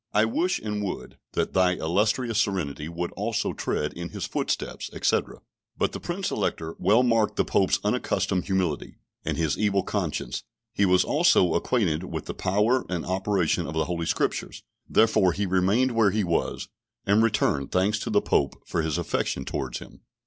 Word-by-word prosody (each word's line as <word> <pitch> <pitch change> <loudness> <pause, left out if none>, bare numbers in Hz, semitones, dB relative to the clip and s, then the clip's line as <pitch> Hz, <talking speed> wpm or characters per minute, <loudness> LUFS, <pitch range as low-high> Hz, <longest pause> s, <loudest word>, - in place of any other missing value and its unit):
I 105 +1 +5
wish 170 +11 0
and 105 -1 -3
would 95 - -5
that - - -1
thy 90 -1 +4
illustrious 105 +7 +1
serenity 80 -7 -2
would 85 +1 -4
also 105 +3 -2
tread 75 - -2
in 85 0 -6
his - - -4
footsteps," - - -3
etc. - - 0 0.4
But - - +1
the - - -6
Prince - - -3
Elector 80 0 -2
well 115 +4 +4
marked 115 -3 +2
the - - +1
Pope's - - +2
unaccustomed 90 -1 0
humility, 95 -6 -1 0.3
and - - -2
his 80 -3 0
evil 100 -2 +2
conscience; 95 -6 -2 0.3
he 100 - +2
was 90 -1 +4
also 145 - +4
acquainted 90 -9 +1
with 80 -4 -5
the - - -4
power 105 +7 +1
and 90 -2 -2
operation 95 -4 0
of 80 - -5
the 80 -1 +1
Holy 85 0 -3
Scriptures. - - -1 0.3
Therefore 100 -5 +4
he 100 +3 -1
remained 95 +8 +2
where 115 -3 +4
he 105 +2 0
was, 85 -2 -1 0.4
and 100 +2 +4
returned 105 -11 +1
thanks 100 +3 +2
to 115 - -4
the 105 -2 +3
Pope 70 - 0
for 85 - -1
his 80 -2 -1
affection 65 - -2
towards 65 -2 -3
him. - - -12
95 Hz, 175 wpm, -26 LUFS, 85-105 Hz, 0.4 s, I